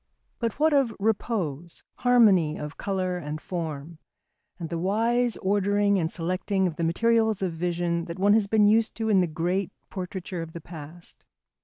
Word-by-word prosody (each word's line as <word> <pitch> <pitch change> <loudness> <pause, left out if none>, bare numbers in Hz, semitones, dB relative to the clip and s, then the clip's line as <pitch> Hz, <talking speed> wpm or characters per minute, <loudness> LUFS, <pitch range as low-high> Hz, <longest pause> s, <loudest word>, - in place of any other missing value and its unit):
But 230 0 -2
what 310 0 +4
of 270 -5 +2
repose, 195 - -2
harmony 205 -11 +4
of 150 0 -6
colour 185 -2 -2
and 150 -1 -5
form, 160 -2 -5 0.6
and 165 -3 -6
the 170 - -3
wise 230 +6 +1
ordering 200 +1 +2
and 160 -2 0
selecting 185 +3 -1
of 170 -4 -1
the 170 - -3
materials 220 +4 +2
of 180 -3 -1
vision 170 0 -1
that 170 - -7
one 200 +2 +4
has 215 -2 +3
been 210 0 +4
used 220 +2 +3
to 220 -1 -2
in 195 -3 +5
the 180 - +1
great 175 +4 -1 0.2
portraiture 185 -1 -5
of 165 0 -8
the 170 - -6
past? 165 +1 -10
185 Hz, 170 wpm, -26 LUFS, 170-215 Hz, 0.6 s, in